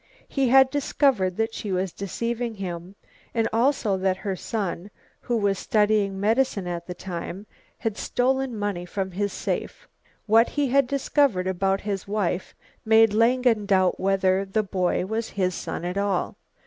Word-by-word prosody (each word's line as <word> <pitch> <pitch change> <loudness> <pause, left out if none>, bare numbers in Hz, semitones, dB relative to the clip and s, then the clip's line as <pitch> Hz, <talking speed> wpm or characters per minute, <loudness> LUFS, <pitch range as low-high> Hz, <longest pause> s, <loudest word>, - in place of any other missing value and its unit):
He 270 -3 0
had 265 +1 +6
discovered 265 -10 +1
that 225 0 0
she 210 - -5
was 185 0 -1
deceiving 230 +4 -3
him, 180 -1 -6 0.4
and 225 -1 +2
also 230 -4 +2
that 185 0 0
her 195 -1 -3
son, 195 -2 -4 0.3
who 240 - -1
was 200 -3 +1
studying 210 -2 +1
medicine 220 -1 +1
at 175 -1 -5
the 180 - -6
time, 180 +2 -6 0.3
had 225 -3 -3
stolen 260 -1 0
money 205 -4 -2
from 190 +1 -4
his 200 +2 -2
safe. - - -4 0.4
What 225 +2 +5
he 290 -2 0
had 275 0 +3
discovered 275 -7 +1
about 190 +1 0
his 200 -2 -4
wife 195 -3 -2 0.3
made 220 -1 +5
Langen 230 -1 +3
doubt 185 -2 +2
whether 190 0 +2
the 205 +2 -1
boy 185 -2 0
was 220 +3 -3
his 185 -2 -1
son 175 - -5
at 180 +3 -2
all. 200 -3 -1
205 Hz, 160 wpm, -25 LUFS, 190-230 Hz, 0.4 s, had